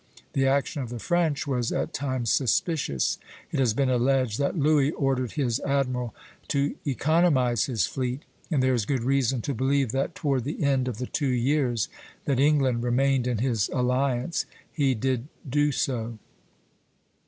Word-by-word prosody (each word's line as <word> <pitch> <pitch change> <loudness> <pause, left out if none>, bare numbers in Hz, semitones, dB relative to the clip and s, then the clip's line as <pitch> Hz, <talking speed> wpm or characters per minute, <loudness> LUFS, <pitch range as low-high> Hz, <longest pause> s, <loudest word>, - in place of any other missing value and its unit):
The 135 0 +2
action 140 +2 +1
of 125 - -5
the 120 - -5
French 165 +2 0
was 125 -4 -1
at - - -2
times 130 -4 -1
suspicious; 135 - +1 0.3
it - - -1
has 120 -5 +2
been 140 0 +2
alleged 125 -2 +1
that 140 +5 0
Louis 145 -2 +3
ordered 135 -5 -1
his 130 -4 0
admiral 125 -4 -1 0.3
to 140 +1 0
economize 140 - +2
his 115 -9 0
fleet, 130 +2 -3 0.3
and 145 -7 +1
there 130 0 +3
is 115 -5 0
good 130 -4 0
reason 130 -2 +1
to 140 - -2
believe 135 0 +1
that 135 +5 -1
toward 135 -5 0
the 150 +4 -3
end 135 -2 +2
of 120 -4 -3
the 125 - -3
two 145 +2 -1
years 125 -2 +1 0.4
that 135 -3 +1
England 135 -4 +3
remained 125 +1 +2
in 125 -2 0
his 115 -3 0
alliance 125 +4 0 0.3
he 140 -4 +2
did 130 +2 -1 0.2
do 145 +3 +2
so. 120 -4 -2
130 Hz, 165 wpm, -26 LUFS, 125-140 Hz, 0.4 s, Louis